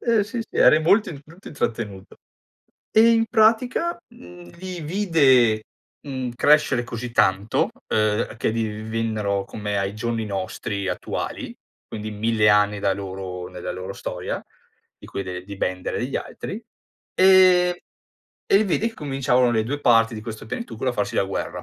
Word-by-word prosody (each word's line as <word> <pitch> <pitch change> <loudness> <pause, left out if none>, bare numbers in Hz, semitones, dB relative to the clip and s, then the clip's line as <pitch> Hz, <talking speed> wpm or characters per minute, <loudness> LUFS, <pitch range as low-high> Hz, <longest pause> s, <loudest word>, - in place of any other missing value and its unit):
eh, 230 -4 +2
sì, 230 +2 -5
sì, 225 - -8
eri 155 +1 +6
molto 175 -4 +2
molto 170 +5 -14
intrattenuto. 110 -8 -4 0.7
E 225 +2 +6
in 225 0 +3
pratica, 240 +9 +2
mhmm, 90 0 -14
li 185 -2 -6
vide, 140 - +3 0.4
mhmm, 130 -3 -4
crescere 150 -3 +3
così 120 0 -6
tanto, 100 -1 +2 0.2
uhm, 110 +1 0
che - - 0
divennero 110 -2 -2
come 105 -1 -4
ai 100 +1 -2
giorni 115 0 -2
nostri 100 0 -4
attuali, - - -4 0.3
quindi 110 0 -6
1000 105 0 +1
anni 105 0 +3
da 100 -1 +2
loro 95 -2 -6
nella - - -6
loro 90 0 -6
storia, - - -5 0.6
di - - -13
quelle 90 -2 -5
di 100 0 -8
Bender 90 -1 -2
e 120 - -1
gli 135 - -3
altri, 215 +4 -6 0.5
e 185 -1 +5 0.7
e - - +7
lì 215 - +4
vedi 210 +4 0
che 225 - -14
cominciavano 135 - +1
le 110 -2 +1
2 140 +6 -3
parti 115 -2 +4
di 110 - -7
questo 110 -1 -8
pianetucolo 130 - -4
a - - -4
farsi 105 - -2
la - - +2
guerra. 95 - -4
115 Hz, 155 wpm, -23 LUFS, 105-170 Hz, 0.7 s, e